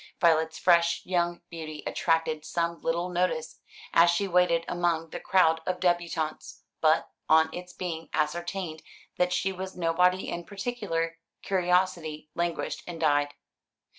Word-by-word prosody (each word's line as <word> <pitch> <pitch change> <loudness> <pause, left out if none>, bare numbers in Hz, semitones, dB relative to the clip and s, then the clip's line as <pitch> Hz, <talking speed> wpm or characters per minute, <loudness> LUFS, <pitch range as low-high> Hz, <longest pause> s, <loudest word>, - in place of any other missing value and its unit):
Violet's 160 -1 +3
fresh 170 -1 +3
young 175 -1 0
beauty 155 -2 -7
attracted 165 -2 0
some 170 +1 -2
little 170 +2 0
notice 175 -3 -1 0.3
as 170 +1 +6
she 175 +4 +1
waited 180 -2 +3
among 170 -2 0
the - - -5
crowd 165 -4 +3
of 180 -1 -1
débutantes; 175 -3 -1 0.2
but, 155 0 +3 0.2
on 160 0 +5
its 180 0 -7
being 165 -3 -5
ascertained 170 +1 -2 0.4
that 180 0 +2
she 190 +2 +1
was 190 0 -7
nobody 180 +2 +2
in 175 - -4
particular, 195 -5 -3 0.2
curiosity 175 -5 0
languished 170 0 -2
and 170 -2 -6
died. 145 -2 +2
170 Hz, 135 wpm, -28 LUFS, 160-180 Hz, 0.4 s, as